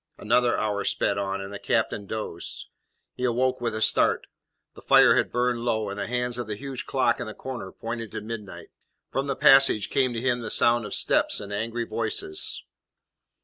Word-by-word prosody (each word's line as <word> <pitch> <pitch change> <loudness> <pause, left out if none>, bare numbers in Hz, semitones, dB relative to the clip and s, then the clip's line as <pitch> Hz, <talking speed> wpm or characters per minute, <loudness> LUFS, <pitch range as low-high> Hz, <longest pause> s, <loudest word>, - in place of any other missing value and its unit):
Another 120 +2 +2
hour 105 -1 -1
sped 100 0 0
on, 100 0 -2
and 100 +1 -7
the 100 - -6
captain 105 -3 -1
dozed. 110 -6 -5 0.4
He 125 - -7
awoke 125 +1 +1
with 115 -2 -1
a 110 - +1
start. - - +3 0.5
The - - -14
fire - - +6
had - - +1
burned 125 0 0
low, 110 -3 -1
and 100 - -6
the 100 - -3
hands 125 0 -2
of 120 - -4
the 105 - -3
huge 135 +2 -6
clock 130 -3 +1
in - - -4
the 110 - -7
corner 125 -8 -7
pointed 115 -1 -6
to - - -4
midnight. 105 -2 -8 0.4
From 135 +1 -1
the 135 - -1
passage 135 -7 +5
came 130 -2 +2
to 115 - -2
him 125 0 0
the 115 - -5
sound 120 0 +3
of - - -4
steps - - +1
and 100 0 -7
angry 115 +3 -2
voices. 110 -9 -2
115 Hz, 195 wpm, -26 LUFS, 105-125 Hz, 0.5 s, fire